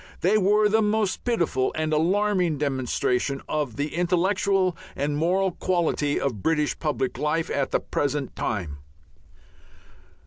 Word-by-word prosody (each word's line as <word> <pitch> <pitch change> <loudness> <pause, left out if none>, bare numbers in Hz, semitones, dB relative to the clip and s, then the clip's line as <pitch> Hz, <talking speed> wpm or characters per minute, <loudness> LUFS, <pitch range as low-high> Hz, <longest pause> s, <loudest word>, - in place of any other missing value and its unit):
They 190 +5 +3
were 210 +1 +4
the 220 +2 +3
most 210 -2 0
pitiful 170 - +1
and 155 0 -1
alarming 180 0 +2
demonstration 135 -1 -1
of 150 -6 -2
the 145 +1 -3
intellectual 185 +2 +1 0.2
and 145 +1 -1
moral 185 +5 +1
quality 170 -5 0
of 120 -8 -2
British 150 +1 0
public 140 -4 -2
life 155 +2 0
at 140 -1 0
the - - +1
present 145 -1 -2
time. 85 -10 -3
160 Hz, 130 wpm, -25 LUFS, 145-190 Hz, 0.2 s, were